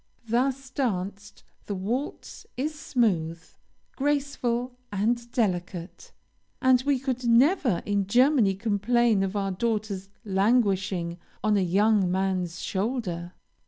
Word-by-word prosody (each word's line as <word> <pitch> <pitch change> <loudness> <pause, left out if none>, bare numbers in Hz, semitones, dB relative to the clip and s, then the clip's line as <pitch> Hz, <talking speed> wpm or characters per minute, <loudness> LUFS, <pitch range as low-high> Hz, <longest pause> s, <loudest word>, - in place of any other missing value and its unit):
Thus 260 +3 0
danced, 200 -6 -3 0.2
the 205 - -2
waltz 230 +10 -4
is 300 +5 -1
smooth, 185 - 0 0.5
graceful, 260 -4 -1
and 235 +4 -1
delicate, 185 -6 -2 0.5
and 260 -1 +4
we 285 -2 +3
could 255 -2 -3
never 245 - +3
in 200 -2 0
Germany 245 -3 +4
complain 220 +1 +2
of 195 +1 -1
our 195 -1 0
daughter's 205 -1 -2 0.2
languishing 195 -4 +1 0.2
on 215 -1 +3
a 200 - +3
young 195 +2 +3
man's 185 -2 -1
shoulder. 190 -5 -2
215 Hz, 110 wpm, -26 LUFS, 190-250 Hz, 0.5 s, and